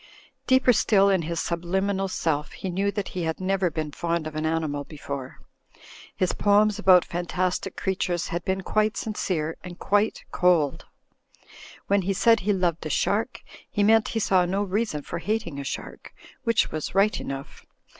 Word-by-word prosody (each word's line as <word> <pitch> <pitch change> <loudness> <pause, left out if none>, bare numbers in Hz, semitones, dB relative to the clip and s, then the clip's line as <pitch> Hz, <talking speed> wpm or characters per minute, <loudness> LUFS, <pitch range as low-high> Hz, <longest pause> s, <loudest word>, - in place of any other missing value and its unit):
Deeper 260 -1 +5
still 200 -2 +4
in 190 -2 +2
his 165 +1 -3
subliminal 190 +4 -1
self 155 -5 -2
he 190 - -5
knew 195 +3 0
that 200 -1 -3
he 180 - -4
had 160 -1 -2
never 190 -1 +1
been 155 -1 -4
fond 170 +1 -2
of 155 -1 -6
an 155 0 -1
animal 155 -3 -1
before. 140 -3 -7 0.8
His 185 -1 0
poems 210 +1 +3
about 185 -3 +6
fantastic 180 +1 -2
creatures 185 -2 -1
had 170 0 -3
been 190 0 -1
quite 215 +3 0
sincere, 170 -7 -2
and 175 -1 -8
quite 205 +2 +1
cold. 170 -6 +2 1.0
When 200 0 +2
he 195 +2 -1
said 225 +3 +4
he 205 +2 0
loved 180 -4 0
a - - -5
shark, 220 - 0 0.3
he 205 - 0
meant 220 +1 +5
he - - +2
saw 190 -3 +3
no 195 +3 0
reason 200 -6 -2
for 170 - -5
hating 205 -7 -2
a - - -4
shark, 135 - -7 0.3
which 230 -1 +2
was 155 +3 -4
right 200 +2 +3
enough. 135 0 -7
185 Hz, 170 wpm, -25 LUFS, 165-200 Hz, 1.0 s, about